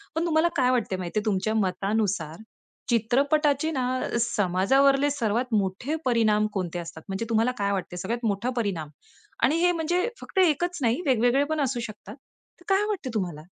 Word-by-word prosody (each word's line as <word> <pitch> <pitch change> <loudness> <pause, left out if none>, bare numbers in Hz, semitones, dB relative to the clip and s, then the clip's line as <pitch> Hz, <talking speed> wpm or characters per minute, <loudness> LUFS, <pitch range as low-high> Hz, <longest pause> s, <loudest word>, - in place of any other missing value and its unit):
पण 325 - 0
तुम्हाला 320 0 +3
काय 255 -2 +3
वाटतंय 220 -6 0
माहितीये, 185 +4 -2
तुमच्या 215 +1 0
मतानुसार 195 -4 -1 0.5
चित्रपटाचे 280 +6 +2
ना 255 -4 -1 0.3
समाजावरले 255 +8 +3
सर्वात 240 -3 0
मोठे 205 +9 0
परिणाम 215 -4 +3
कोणते 180 -3 -3
असतात? 165 -1 -8
म्हणजे 195 +4 -3
तुम्हाला 225 +2 +2
काय 200 0 0
वाटतंय, 180 -2 -3
सगळ्यात 230 +6 -3
मोठा 205 +4 -1
परिणाम 180 -9 -2 0.5
आणि 290 - +4
हे 355 - +5
म्हणजे 350 +5 0
फक्त 385 - -3
एकच 350 0 +2
नाही 240 +7 +1
वेगवेगळे 255 +1 +3
पण 315 -1 0
असू 260 -3 -1
शकतात. 215 +4 -11 0.4
तर - - -18
काय 390 +2 +3
वाटतंय 355 -12 -3
तुम्हाला? 175 -7 -3
235 Hz, 160 wpm, -26 LUFS, 195-285 Hz, 0.5 s, हे